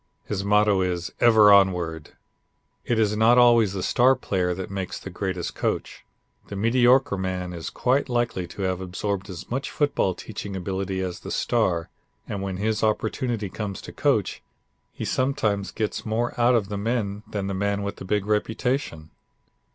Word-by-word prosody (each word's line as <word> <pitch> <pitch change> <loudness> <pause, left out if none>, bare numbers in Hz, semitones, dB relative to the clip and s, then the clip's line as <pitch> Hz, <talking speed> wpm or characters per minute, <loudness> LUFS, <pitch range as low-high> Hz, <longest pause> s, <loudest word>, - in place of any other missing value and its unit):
His 100 -2 -3
motto 105 -1 +3
is, 90 -2 -2
"Ever 110 -3 +7
Onward." 90 -5 +2 0.7
It 120 - 0
is 105 -1 +2
not 115 +3 +5
always 120 -5 +5
the 95 - -3
star 130 +2 +4
player 90 -7 -1
that 95 +1 -6
makes 95 -2 -4
the 95 - -8
greatest 90 -1 -3
coach. - - -3 0.4
The 100 - -7
mediocre 125 +2 +3
man 90 -1 -3
is 85 -2 -5
quite 130 +2 0
likely 120 -7 -1
to 95 +3 -6
have 95 0 -1
absorbed 95 +2 -3
as 90 +3 -9
much 135 +3 -2
football 145 - 0
teaching 100 -2 -7
ability 95 +1 -3
as 90 -2 -4
the - - -9
star; 90 -9 0 0.4
and 100 -2 -4
when 95 -1 -3
his 105 +1 -1
opportunity 110 0 -1
comes 100 0 -5
to - - -9
coach, - - 0 0.5
he - - -6
sometimes 110 -7 0
gets 110 -2 -3
more 115 +2 -1
out 120 +1 +4
of 105 -4 0
the 100 -1 -3
men 105 -2 -2
than 100 -2 -3
the 100 - -2
man 100 +1 -1
with 100 0 -4
the - - -8
big 100 +1 0
reputation. 105 - -1
100 Hz, 170 wpm, -24 LUFS, 95-115 Hz, 0.7 s, Ever